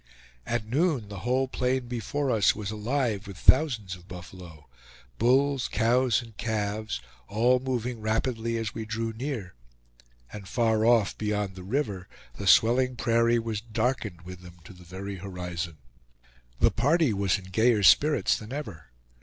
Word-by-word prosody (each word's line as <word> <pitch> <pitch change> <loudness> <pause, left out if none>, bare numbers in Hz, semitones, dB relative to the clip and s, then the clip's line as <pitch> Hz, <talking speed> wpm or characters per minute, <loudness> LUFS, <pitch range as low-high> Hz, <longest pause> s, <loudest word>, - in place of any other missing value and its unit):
At 115 -2 -1
noon, 135 - 0
the 100 -2 -7
whole 130 +6 0
plain 125 -1 -1
before 125 +4 -2
us 105 -5 +3
was 105 -1 -4
alive 110 -1 -1
with 100 -2 -9
thousands 125 - +3
of 90 0 -17
buffalo 90 -4 -11 0.5
bulls, 135 +2 +3
cows, 120 0 +2
and 115 -2 -14
calves 110 - -2 0.3
all 120 +4 +3
moving 125 -3 -3
rapidly 115 +1 -1
as 110 -2 -3
we 110 - -5
drew 110 +1 -3
near; 115 -6 -5 0.8
and 100 -2 -8
far 110 -1 +1
off 115 -4 +3
beyond 105 -2 -1
the 95 - -10
river 100 -3 -2 0.3
the 100 - -4
swelling 125 +6 +4
prairie 115 0 +2
was 115 -2 -3
darkened 110 -5 -2
with 90 0 -10
them 90 -1 -13
to 95 - -12
the 90 0 -15
very 95 +3 -7
horizon. 90 -3 -5 0.8
The - - +4
party 145 +1 +2
was 100 -1 +1
in 95 -1 -12
gayer 110 +1 +3
spirits 150 - +5
than 110 +2 -10
ever. 105 - -6
110 Hz, 155 wpm, -27 LUFS, 100-125 Hz, 0.8 s, spirits